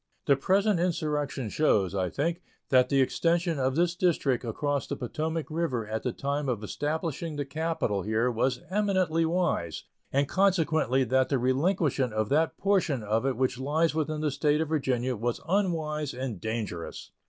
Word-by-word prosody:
The 140 - +5
present 195 +6 +2
insurrection 150 -7 -1
shows, 100 - +2
I 95 -2 0
think, 165 - -2 0.3
that 130 -1 +4
the 140 -1 +3
extension 170 +3 +1
of 130 0 +1
this 170 +1 +2
District 150 -9 +1
across 140 +5 -2
the - - -3
Potomac 160 +6 -3
River 140 -9 -1
at 110 0 -3
the 125 - -1
time 140 +2 -2
of 115 -4 -2
establishing 155 +5 -3
the 145 -1 -2
capital 150 -8 -1
here 110 +5 +1
was 125 +2 0
eminently 185 -5 +1
wise, 160 - -1 0.3
and 140 +1 +2
consequently 160 -8 +2
that 130 +1 +2
the 140 - +2
relinquishment 135 - +1
of 110 -1 -1
that 155 +3 +1
portion 180 - +1
of 110 +5 0
it 130 -4 -1
which 130 -1 0
lies 155 +5 +1
within 155 -1 -1
the 150 -1 0
State 145 +2 +1
of 160 -1 -1
Virginia 130 -5 0
was 120 +2 -2
unwise 160 -7 0
and 125 -7 -4
dangerous. 110 -7 -4
145 Hz, 165 wpm, -28 LUFS, 125-165 Hz, 0.3 s, The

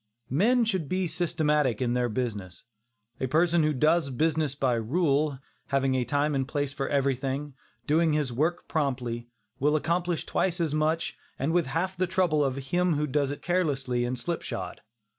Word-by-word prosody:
Men 230 - +3
should 190 -10 -1
be 185 0 0
systematic 150 -7 +1
in 120 -2 0
their 125 -1 +1
business. 105 -6 -4 0.6
A 130 - -1
person 170 +4 +3
who 155 0 +2
does 155 +2 +2
business 155 +1 0
by 135 -3 +1
rule, 140 +4 +1 0.3
having 135 -1 +1
a 130 -1 +1
time 145 +2 +1
and 135 -1 0
place 145 -1 -2
for 135 - -3
everything, 140 +1 -1 0.3
doing 160 +1 +3
his 145 -5 0
work 160 +8 0
promptly, 125 -6 -2 0.3
will 150 +3 +3
accomplish 170 +2 0
twice 180 -1 0
as 160 -3 0
much 155 +2 0 0.2
and 140 +5 -1
with 175 -4 +2
half 170 +7 -1
the 185 0 0
trouble 175 -5 +2
of 135 -2 0
him 170 +6 0
who 150 +1 0
does 140 0 0
it 145 - -6
carelessly 135 -9 0
and 125 +1 -2
slipshod. 120 - -4
150 Hz, 170 wpm, -27 LUFS, 130-165 Hz, 0.6 s, Men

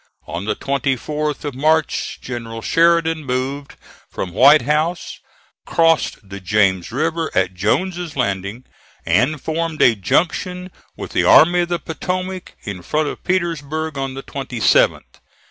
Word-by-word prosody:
On 85 +5 -5
the 105 0 -1
24th 140 +2 -2
of 145 - -3
March, 155 +4 0
General 115 -2 -6
Sheridan 165 -1 +2
moved 135 +2 -3 0.3
from 90 - -5
White 140 +6 +6
House, 155 +5 -1 0.5
crossed 165 -9 +1
the 100 +1 -8
James 95 -1 +1
River 160 +5 -1
at 95 - +1
Jones's 170 - -1
Landing, 100 -1 -2 0.4
and 145 +7 +2
formed 160 +2 -3
a 120 - +6
junction 180 - -1 0.3
with - - -7
the - - +1
Army 175 +2 +6
of 175 0 0
the 175 - 0
Potomac 185 +3 -5
in 100 -3 -6
front 150 - -1
of - - -8
Petersburg 160 -4 -2
on 135 -1 -4
the 135 - -7
27th. 130 -5 +1
145 Hz, 135 wpm, -19 LUFS, 120-165 Hz, 0.5 s, White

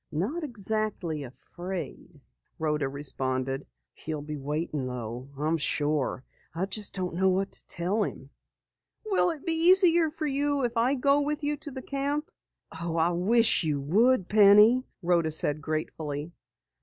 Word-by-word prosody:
"Not 215 - -2
exactly 215 - -2
afraid," 175 +4 -8 0.4
Rhoda 150 -3 -1
responded. 135 -1 -1 0.3
"He'll 155 -2 -6
be 150 0 -5
waiting 150 -1 -3
though, 125 +1 -6
I'm 155 +3 0
sure. 145 -3 -1 0.3
I 175 +3 0
just 205 +2 -3
don't 180 -2 -3
know 190 +2 +2
what 190 +1 0
to - - -5
tell 185 +6 -1
him." 140 -7 -7 0.7
"Will 395 -4 +2
it 320 -4 -6
be 330 - 0 0.2
easier 345 -4 +5
for 315 0 -5
you 285 0 0
if 240 0 -1
I 240 +4 +2
go 280 +2 +3
with 295 +1 -2
you 295 +1 0
to 295 +1 -8
the 260 -2 -8
camp?" 285 +2 -2 0.5
"Oh, 170 -1 -3
I 165 +2 +3
wish 220 +5 +3
you 150 -3 0
would, 195 - +2
Penny!" 210 +4 +6 0.2
Rhoda 170 -2 +2
said 150 -1 0
gratefully. 155 0 -4
180 Hz, 150 wpm, -27 LUFS, -, 0.7 s, Penny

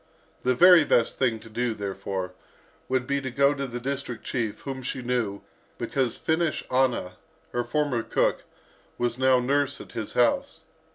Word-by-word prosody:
The 125 0 +2
very 175 +3 +8
best 120 -5 +2
thing 120 -4 +1
to 115 - -13
do, 115 +1 -2
therefore, 95 -2 -4 0.6
would 130 -1 +1
be 140 +1 0
to 130 - -3
go 140 +2 +3
to 140 -1 -3
the 120 -1 -5
district 130 -2 -4
chief, 115 -5 -3
whom 135 -1 -5
she 130 0 -4
knew, 120 -5 -1 0.4
because 130 -4 -1
Finnish 160 0 0
Anna, 125 -8 +1 0.3
her 120 - -1
former 135 -1 0
cook, - - 0 0.5
was 120 0 -1
now 130 -1 +5
nurse 140 +2 +1
at - - -11
his - - -5
house. - - +1
125 Hz, 165 wpm, -26 LUFS, 115-140 Hz, 0.6 s, very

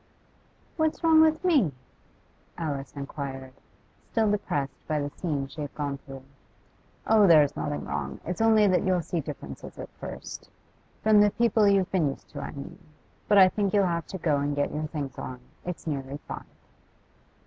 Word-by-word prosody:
'What's 315 0 0
wrong 320 -1 +7
with 315 +2 +3
me?' 280 - +4 0.9
Alice 145 -4 -3
inquired, 140 -2 -6 0.6
still 220 -2 +2
depressed 145 -9 -2
by 155 -1 0
the 145 0 -3
scene 145 -6 -2
she 145 +3 -9
had 145 - -6
gone 140 -2 -3
through. 135 -1 -11 0.8
'Oh, 215 -2 +5
there's 150 -4 +6
nothing 75 -2 -3
wrong. 70 -1 -4
It's 180 +5 -3
only 220 -1 +5
that 185 -2 +3
you'll 185 -3 +1
see 170 - -2
differences 150 -1 -8
at - - -7
first; - - -8 0.5
from 215 -1 +6
the 205 - +6
people 225 -1 +3
you've 195 -2 +3
been 175 -6 +2
used 135 - -9
to, 145 - -6
I - - -5
mean. 145 +6 -9 0.5
But 205 - +5
I 190 -1 +9
think 200 +1 0
you'll 200 -1 +4
have 170 -2 -1
to 190 - -5
go 155 -5 +1
and 145 +1 -1
get 145 0 0
your 155 +1 -2
things 145 -4 -5
on; 125 -1 -6 0.3
it's 180 -2 -5
nearly 140 -3 -3
five. - - -6
160 Hz, 175 wpm, -27 LUFS, 140-205 Hz, 0.9 s, I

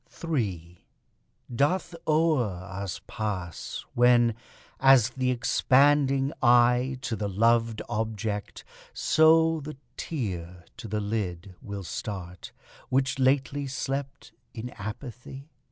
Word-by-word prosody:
3 95 - -4 0.7
Doth 170 +7 +1
o'er 155 -4 +3 0.2
us 95 0 -6
pass, 95 -6 -5
when, 120 -1 +4 0.5
as 135 -3 +6
th' 130 0 -1
expanding 135 +2 +3
eye 125 +1 +4
To 125 -4 -2
the 105 -1 -3
loved 115 +2 +2
object 110 -2 -3 0.3
so 160 +1 +4
the 150 -1 -8 0.2
tear 90 - -5
to 115 -1 -8
the 105 +1 -2
lid 100 -3 -3
Will 100 -1 -6
start, 90 -1 -6 0.4
which 130 0 +1
lately 135 +2 +1
slept 135 +2 -4 0.2
in 120 +2 -6
apathy? 125 +7 -8
120 Hz, 105 wpm, -27 LUFS, 105-135 Hz, 0.7 s, as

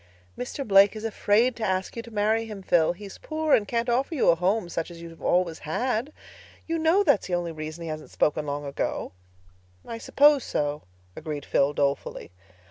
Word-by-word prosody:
"Mr. 250 +2 -5
Blake 195 +1 +6
is 215 +1 -6
afraid 225 +3 +2
to 230 - -6
ask 190 -2 -1
you 230 - -4
to 235 - -12
marry 220 +1 +1
him, 210 -3 -8
Phil. 170 -2 +3
He 205 +4 -11
is 195 - -10
poor 310 -1 -1
and 205 - +4
can't 235 0 -1
offer 260 +6 0
you 275 - +3
a 170 - +6
home 185 +3 0
such 165 0 -4
as 170 -1 -11
you've 165 -1 -11
always 175 -2 +1
had. 245 - -2 0.5
You 330 0 -2
know 330 +6 +4
that 285 - +4
is - - -8
the 180 - 0
only 175 -1 -2
reason 155 +1 -7
he 165 - -5
hasn't 155 0 -6
spoken 150 0 0
long 145 0 -3
ago." 140 - -3 0.8
"I 230 - -6
suppose 290 +2 +4
so," 145 0 -2 0.3
agreed 150 -3 -5
Phil 140 +1 +2
dolefully. 140 - -2
195 Hz, 205 wpm, -26 LUFS, 160-235 Hz, 0.8 s, Blake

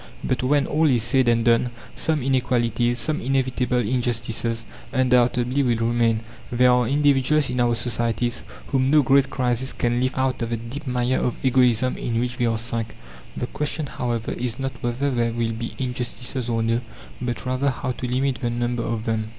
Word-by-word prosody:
But, 130 - 0
when 140 +2 +2
all 155 +1 +2
is 120 -4 +3
said 125 +2 +3
and 115 -1 +3
done, 120 +1 +3 0.3
some 155 -4 0
inequalities, 120 -2 +1
some 150 +6 0
inevitable 130 -1 0
injustices, 115 -1 -1 0.3
undoubtedly 125 +1 +2
will 120 -4 +2
remain. 115 -1 +1 0.3
There 125 +1 +4
are 125 -1 +3
individuals 140 0 +2
in 125 - -2
our 120 -1 +3
societies 120 0 0 0.3
whom 130 -1 +2
no 150 0 +5
great 135 +1 +4
crisis 125 0 0
can 120 0 0
lift 130 +1 -1
out 130 -1 0
of 115 - -2
the 115 - -1
deep 130 +6 -7
mire 125 0 +1
of 125 - -1
egoism 130 -1 +3
in 115 -1 -1
which 125 +1 -2
they 120 - +1
are 115 -1 +1
sunk. 115 0 -3 0.4
The - - -1
question, 150 +4 -3
however, 120 -4 -3
is 120 -1 -3
not 135 0 -2
whether 125 +4 -1
there 120 -2 0
will 115 -1 -1
be 115 +1 -5
injustices 125 0 -3
or 115 -1 0
no, 115 +1 +1 0.4
but 125 +1 -3
rather 130 +2 +1
how 130 - -3
to 125 0 -4
limit 130 +1 0
the 120 - 0
number 120 0 -1
of 115 -1 -3
them. 110 -2 -1
125 Hz, 185 wpm, -23 LUFS, 115-130 Hz, 0.4 s, no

